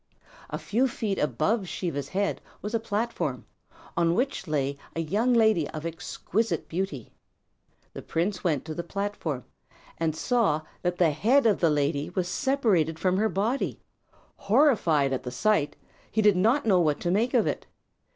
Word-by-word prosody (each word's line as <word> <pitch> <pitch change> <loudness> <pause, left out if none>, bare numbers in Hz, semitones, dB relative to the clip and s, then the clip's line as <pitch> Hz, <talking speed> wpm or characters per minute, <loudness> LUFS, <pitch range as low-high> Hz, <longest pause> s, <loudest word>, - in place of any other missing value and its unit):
A - - -3
few 245 +6 +1
feet 220 -5 -2
above 180 - 0
Siva's 145 -6 -3
head 200 +1 -1 0.2
was 210 +2 -4
a 230 - +2
platform, 225 +1 -2 0.5
on 170 0 +2
which 250 -6 -1
lay 140 -2 -1 0.2
a - - -2
young 205 +10 +1
lady 220 -10 +3
of 155 +1 -6
exquisite 170 +3 -2
beauty. 165 - -4 0.8
The - - -7
prince 180 +3 -2
went 155 -7 0
to 160 - -5
the 170 - -3
platform 200 - -4 0.5
and 160 -2 0
saw 210 -7 +1 0.2
that 175 0 -1
the 170 -3 +4
head 235 - +3
of 215 -3 +3
the 165 - +4
lady 145 0 0
was 180 0 -2
separated 200 - +1
from 185 +3 +1
her 220 +2 +2
body. 215 +8 -1 0.6
Horrified 200 - +3
at 130 - -1
the 125 - -5
sight, 150 +3 +1 0.3
he 220 - +1
did 205 -2 +6
not 225 +10 +3
know 195 -5 +4
what 155 -4 +2
to 175 - 0
make 230 +7 +1
of 235 - +4
it. - - -3
185 Hz, 165 wpm, -27 LUFS, 155-220 Hz, 0.8 s, did